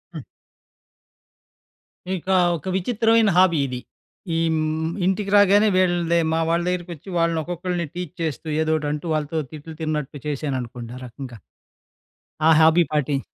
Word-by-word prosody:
హ్మ్. - - -6 1.9
ఇకా, 190 +3 0 0.2
ఒక 155 - -11
విచిత్రమైన 225 +2 +2
హాబీ 180 -3 +5
ఇది. 125 -1 -5 0.6
ఈమ్ 165 -1 +1 0.5
ఇంటికి 195 +2 0
రాగానే 205 +1 +6
వీళ్ళన్ది 175 -2 +2
మా 165 - +1
వాళ్ళ 170 +1 +1
దగ్గరికి 180 -1 -2
వచ్చి, 170 +6 -13
వాళ్ళని 165 -1 +1
ఒక్కొక్కళ్ళని 175 0 -3
టీచ్ 180 -1 -6
చేస్తూ, 160 0 -4
ఏదో 160 0 +1
ఒకటి 150 -1 -3
అంటూ, 150 +2 -4
వాళ్ళతో 155 +1 -2
తిట్లు, 155 +1 -9
తిన్నట్టు 150 -2 -3
చేశాననుకోండి. 125 -5 -4
ఆ - - -10
రకంగా. 120 -1 -9 1.1
ఆ - - +6
హాబీ 160 +2 +6
పాటిం 145 -2 0
165 Hz, 135 wpm, -22 LUFS, 150-180 Hz, 1.9 s, రాగానే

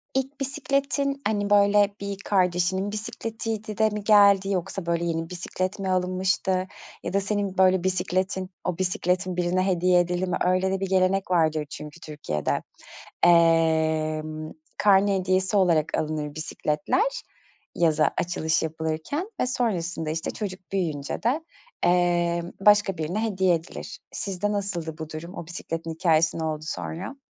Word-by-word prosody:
ilk 270 +2 -2
bisikletin, 275 0 -1
hani, 205 -1 0
böyle, 205 0 +4
bir 200 0 -4
kardeşinin 185 +1 +1
bisikletiydi 220 0 -4
de 220 0 +4
mi 210 -1 -5
geldi? 200 -2 +6
Yoksa, 185 -1 -2
böyle, 170 0 0
yeni 165 -1 -2
bisiklet 185 +2 -3
mi 195 -1 -2
alınmıştı 185 0 0 0.4
ya 175 - -4
da 200 - +2
senin 200 -1 -2
böyle 185 -1 +4
bisikletin 185 0 -1
o 180 -2 -2
bisikletin 180 -1 0
birine 180 +1 +1
hediye 180 -1 +3
edildi 180 +1 0
mi? 180 - 0
Öyle 185 +1 +2
de 190 - -1
bir 195 - -2
gelenek 190 0 +2
vardır 160 -3 +2
çünkü 150 +3 -9
Türkiye'de. 145 - -3 0.6
Emm, 160 -2 +3 0.3
karne 200 0 +4
hediyesi 185 +2 +1
olarak 170 -5 +2
alınır 150 -1 -3
bisikletler. 155 - 0 0.6
Yaza 155 -3 +3
açılış 165 -2 0
yapılırken 160 - -3
ve 255 - +2
sonrasında, 180 -10 -1
işte, 160 +1 -3
çocuk 195 -3 -5
büyüyünce 160 -7 -2
de, 260 +8 +1 0.5
emm, 175 -1 +1
başka 205 -3 +5
birine 175 +8 -2
hediye 190 -4 +2
edilir. 165 +1 -7
Sizde 200 +1 -2
nasıldı 175 -6 -3
bu 160 -1 -6
durum? 170 +4 -7
O - - -6
bisikletin 165 -1 -5
hikâyesi 160 -1 +2
ne - - -2
oldu 155 -1 -3
sonra? 190 +12 -5
185 Hz, 140 wpm, -25 LUFS, 165-200 Hz, 0.6 s, geldi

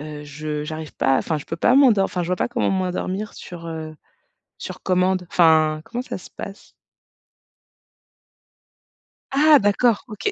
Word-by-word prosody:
heu, 150 0 -8
je 150 +1 -5
j'arrive 155 -1 -7
pas, 135 0 +2
enfin 155 -3 -1
je - - -10
peux 165 - -4
pas 240 +9 +3
m'endor 230 -9 +5
enfin 180 -3 -3
je 170 - -4
vois 180 - 0
pas - - -1
comment 240 -4 0
m'endormir 190 +2 -2
sur, 170 -1 -10
heu, 160 -1 -6 0.6
sur - - -8
commande. 185 -1 +1
Enfin, 155 -2 +4
comment 245 +1 -4
ça 255 - -6
se - - -13
passe? 200 0 -9 2.6
Ah 295 +1 +6
d'accord, 205 +2 +2
OK. 225 - -3
180 Hz, 155 wpm, -22 LUFS, 155-210 Hz, 2.6 s, Ah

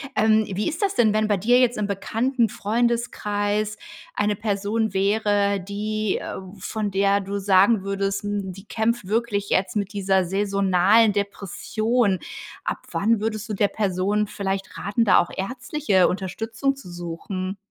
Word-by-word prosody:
Ähm, 220 0 +4
wie 210 - -1
ist 330 +6 -4
das 395 0 +1
denn, 220 -3 +3
wenn 215 0 +2
bei 205 -2 +2
dir 240 +6 +4
jetzt 245 -3 +2
im 205 - 0
bekannten 230 +5 0
Freundeskreis 210 -2 -1 0.4
eine 205 0 0
Person 210 +1 -1
wäre, 200 0 +2
die 210 +2 -2
äh, - - -6 0.2
von 210 +1 -3
der 200 +1 +3
du 200 +1 -4
sagen 195 +2 +4
würdest: 195 0 -2
„Hm, 205 -2 -3
die 195 +3 -13
kämpft 225 -2 -1
wirklich 210 -2 -1
jetzt 190 +3 +1
mit 200 0 -2
dieser 190 -2 +1
saisonalen 200 +2 +3
Depression“. 205 +2 -1 0.4
Ab - - -2
wann 225 +1 +2
würdest 215 0 -3
du - - -2
der 205 +1 +3
Person 200 +1 0
vielleicht 195 -2 -4
raten, 220 +3 0
da 195 - +6
auch 175 - +2
ärztliche 245 -1 +1
Unterstützung 225 +8 -2
zu 180 -10 -11
suchen? 180 +3 -5
205 Hz, 155 wpm, -23 LUFS, 195-220 Hz, 0.4 s, da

